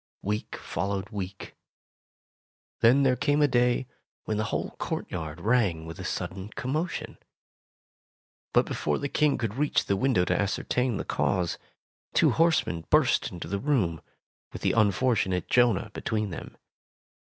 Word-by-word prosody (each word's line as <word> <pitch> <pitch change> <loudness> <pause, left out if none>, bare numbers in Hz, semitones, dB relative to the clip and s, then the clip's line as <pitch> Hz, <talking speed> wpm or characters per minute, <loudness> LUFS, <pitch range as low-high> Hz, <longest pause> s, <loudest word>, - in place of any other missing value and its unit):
Week 105 +2 -2
followed 100 +1 -3
week. 95 -2 -6 1.3
Then 130 +5 +5
there 130 -2 +4
came 145 +3 +1
a 145 - +5
day 125 -1 +2 0.4
when 110 - -2
the 110 - 0
whole - - -2
courtyard 80 -2 -4
rang 100 -6 +1
with 80 0 -8
a - - -5
sudden 95 +2 -4
commotion. 155 +7 -3 1.3
But - - +4
before - - -1
the 140 - -2
King 150 +1 +2
could 115 -4 -2
reach 145 +4 +1
the 100 - +1
window 95 -4 +2
to 90 - +1
ascertain 120 +3 0
the - - -4
cause, 90 -3 0 0.6
two - - +5
horsemen 160 - +2
burst - - +3
into 85 - -7
the 100 - -2
room, 105 - 0 0.5
with - - -8
the - - +3
unfortunate 105 -3 +2
Jonah 120 -3 +3
between 110 -6 -2
them. 80 - -8
110 Hz, 145 wpm, -27 LUFS, 95-130 Hz, 1.3 s, Then